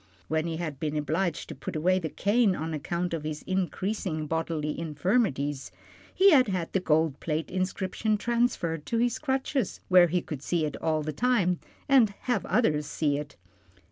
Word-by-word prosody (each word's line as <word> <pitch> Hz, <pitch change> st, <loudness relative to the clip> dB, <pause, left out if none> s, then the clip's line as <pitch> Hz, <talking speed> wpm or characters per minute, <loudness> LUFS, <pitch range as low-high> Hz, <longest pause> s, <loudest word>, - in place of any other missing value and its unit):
When 160 Hz, +1 st, 0 dB
he 165 Hz, -1 st, -3 dB
had 155 Hz, -5 st, -4 dB
been 150 Hz, -1 st, -2 dB
obliged 160 Hz, +3 st, -1 dB
to -, -, -5 dB
put -, -, -7 dB
away 185 Hz, +4 st, +2 dB
the 160 Hz, -3 st, -3 dB
cane 205 Hz, +1 st, +2 dB
on 160 Hz, 0 st, -4 dB
account 170 Hz, +4 st, -2 dB
of 160 Hz, -2 st, -3 dB
his 155 Hz, 0 st, -5 dB
increasing 185 Hz, -3 st, -2 dB
bodily 160 Hz, -1 st, -2 dB
infirmities, 150 Hz, -, 0 dB, 0.4 s
he 390 Hz, +1 st, +5 dB
had 265 Hz, -6 st, +6 dB
had 185 Hz, -4 st, -2 dB
the 190 Hz, -, +3 dB
gold 160 Hz, -4 st, +1 dB
plate 155 Hz, 0 st, -2 dB
inscription 190 Hz, +3 st, -1 dB
transferred 205 Hz, -10 st, 0 dB
to 230 Hz, -, 0 dB
his 240 Hz, +1 st, +1 dB
crutches 265 Hz, -1 st, -1 dB
where 180 Hz, -1 st, +7 dB
he 175 Hz, +1 st, 0 dB
could 150 Hz, -6 st, -6 dB
see 165 Hz, +1 st, 0 dB
it 150 Hz, -, -4 dB
all 155 Hz, -1 st, 0 dB
the 155 Hz, 0 st, -3 dB
time, 205 Hz, -7 st, +2 dB, 0.3 s
and 240 Hz, -7 st, +4 dB
have 245 Hz, -1 st, -1 dB
others 150 Hz, -11 st, +2 dB
see 145 Hz, -2 st, 0 dB
it. 145 Hz, -1 st, -8 dB
170 Hz, 175 wpm, -28 LUFS, 155-205 Hz, 0.4 s, where